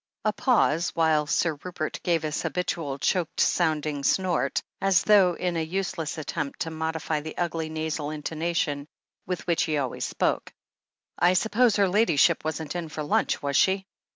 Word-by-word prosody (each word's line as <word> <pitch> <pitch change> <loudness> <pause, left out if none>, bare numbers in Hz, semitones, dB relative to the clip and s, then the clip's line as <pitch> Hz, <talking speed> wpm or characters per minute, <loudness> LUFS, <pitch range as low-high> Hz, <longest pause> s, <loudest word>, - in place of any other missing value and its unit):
A 215 - +2
pause, 195 - +2
while 155 -2 +2
Sir 155 -1 0
Rupert 175 -4 -4
gave 170 -2 +1
his 155 0 -2
habitual, 165 -6 -2
choked 175 +4 -1
sounding 155 -4 +1
snort, 175 -5 +1 0.2
as 195 -3 +3
though 195 -5 +5
in 180 -1 -2
a 165 - 0
useless 170 -2 -3
attempt 150 -1 -4
to 165 - -2
modify 160 -1 -2
the 155 +1 -8
ugly 165 -2 -2
nasal 155 -1 -3
intonation 155 -1 -2 0.4
with 180 -1 -3
which 170 -2 +1
he 155 -2 0
always 135 -3 -2
spoke. - - -1 0.7
I 175 +2 +5
suppose 220 +4 +3
her 200 -2 +3
Ladyship 195 -6 +3
wasn't 155 +1 -4
in 170 -2 -4
for 155 0 -5
lunch, 145 - 0
was 140 -1 -1
she?" 190 +4 +3
160 Hz, 160 wpm, -26 LUFS, 155-180 Hz, 0.7 s, though